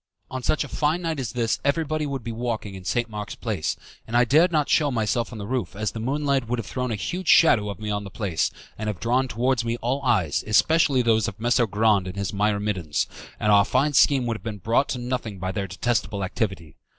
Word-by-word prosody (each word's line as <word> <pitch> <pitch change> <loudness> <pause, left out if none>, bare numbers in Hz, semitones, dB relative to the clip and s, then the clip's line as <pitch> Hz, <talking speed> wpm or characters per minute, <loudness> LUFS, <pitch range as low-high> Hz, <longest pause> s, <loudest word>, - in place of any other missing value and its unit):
On 130 - -4
such 155 - +1
a - - -7
fine 155 +6 0
night 160 -3 -2
as 125 -4 -3
this 115 -2 0
everybody 155 +1 0
would 135 -3 -4
be 115 - -4
walking 115 -3 -3
in 95 -1 -9
St. 120 +5 0
Mark's 105 -2 -6
Place, - - -2 0.3
and 115 +2 0
I 125 - +5
dared 155 +8 +4
not 150 -3 +1
shew 150 -2 +3
myself 115 -1 -1
on 115 - -7
the 105 - -5
roof 110 -6 -3
as 105 0 -2
the 115 - -6
moonlight 135 +1 0
would 125 +1 -1
have 115 - -4
thrown 125 +3 -3
a - - 0
huge 175 - -4
shadow 115 -11 +5
of 100 - -6
me 105 -1 -3
on 105 0 -2
the 100 - -7
place, 95 -6 -1 0.3
and 110 - -3
have 105 -4 -3
drawn 125 +3 +1
towards 125 +1 0
me 115 0 -2
all 125 +4 -1
eyes, 100 - +1
especially 140 +4 +3
those 110 -3 +2
of 100 - -6
Messer 120 +1 +2
Grande 105 -2 +2
and 90 - -6
his 100 0 -3
myrmidons, 100 -6 0 0.3
and 105 - +2
our 100 -1 +7
fine 135 +7 +1
scheme 135 -1 +4
would 115 -2 -1
have 100 - -17
been 110 -2 -4
brought 115 +8 +1
to - - -2
nothing 120 -4 -4
by 95 0 -3
their 100 0 -3
detestable 105 +1 -1
activity. 95 - -3
115 Hz, 235 wpm, -24 LUFS, 105-130 Hz, 0.3 s, our